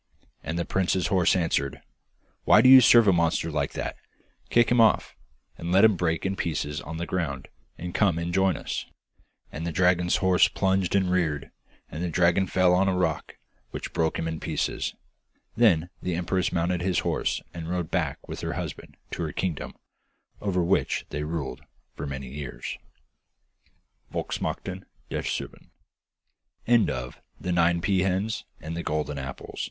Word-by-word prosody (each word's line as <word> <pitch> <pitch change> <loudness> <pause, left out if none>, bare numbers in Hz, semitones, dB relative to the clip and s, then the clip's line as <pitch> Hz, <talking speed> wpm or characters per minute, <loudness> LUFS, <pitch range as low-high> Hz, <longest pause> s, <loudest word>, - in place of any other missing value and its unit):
And 80 - -4
the 85 - -1
prince's 95 -1 0
horse 95 -3 +3
answered, 80 -6 0 0.6
'Why 105 - +6
do 130 - +5
you 130 0 +11
serve 120 -2 +7
a 95 - +6
monster 85 -2 +1
like - - -1
that? - - -4 0.5
Kick 120 0 +4
him 120 -1 +5
off, 110 -3 +3 0.4
and 85 +1 -4
let 95 +3 +5
him 110 -3 +5
break 85 -1 -1
in 95 +1 0
pieces 75 -4 -2
on 80 +1 -7
the 85 - -3
ground, 75 -7 -3 0.3
and 90 +1 -6
come 95 -6 +2
and 85 +1 -3
join 95 -1 +2
us.' - - -4 0.6
And 80 - -6
the 85 - -2
dragon's 90 +1 +3
horse 95 -1 +4
plunged 95 -1 0
and 95 -2 +2
reared, 80 -6 0 0.4
and 80 - -5
the 90 - -1
dragon 90 +3 +3
fell 90 0 +3
on 95 +2 +3
a 95 -1 +1
rock, 80 -4 -1 0.3
which - - -6
broke 80 -1 0
him 80 - -2
in 80 -1 -3
pieces. - - -2 0.6
Then 90 -7 +3
the 90 -2 -2
empress 90 +1 0
mounted 85 +1 0
his 90 0 +1
horse, - - 0
and 85 -1 -6
rode 90 -2 -2
back - - -2
with - - -6
her - - -3
husband - - -6
to - - -4
her 80 -2 -2
kingdom, 85 -4 -3 0.7
over 90 -3 0
which 85 - +1
they 75 - -4
ruled 75 -3 -4 0.3
for - - -6
many 65 -1 -5
years. 70 0 -6 1.3
(Volksmarchen - - -4 0.3
der - - -1
Serben.) - - -5
90 Hz, 150 wpm, -26 LUFS, 80-95 Hz, 1.3 s, you